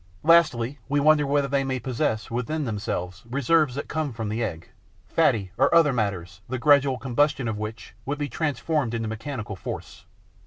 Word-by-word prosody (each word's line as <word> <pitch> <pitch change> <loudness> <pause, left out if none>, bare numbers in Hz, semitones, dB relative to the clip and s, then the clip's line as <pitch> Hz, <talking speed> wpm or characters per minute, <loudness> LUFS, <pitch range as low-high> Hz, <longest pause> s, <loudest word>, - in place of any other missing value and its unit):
Lastly, 150 -6 +4
we 145 +1 +2
wonder 150 0 +4
whether 140 0 +2
they 140 0 +1
may 130 -1 -1
possess 115 -4 -2
within 140 +6 -2
themselves 100 -4 -4
reserves 140 +1 +2
that 140 - -4
come 155 -4 -2
from 110 -2 -4
the 115 +3 -1
egg, 85 -6 -5 0.4
fatty 100 -4 +2
or - - +4
other 160 -4 +5
matters 95 -6 -3
the 130 - -2
gradual 140 0 +4
combustion 135 +2 +1
of 110 -2 -3
which 110 +1 -6
would 145 +2 -3
be 145 0 -2
transformed 145 -2 -1
into 115 -1 -2
mechanical 110 -1 -5
force. - - -7
130 Hz, 170 wpm, -25 LUFS, 110-145 Hz, 0.4 s, other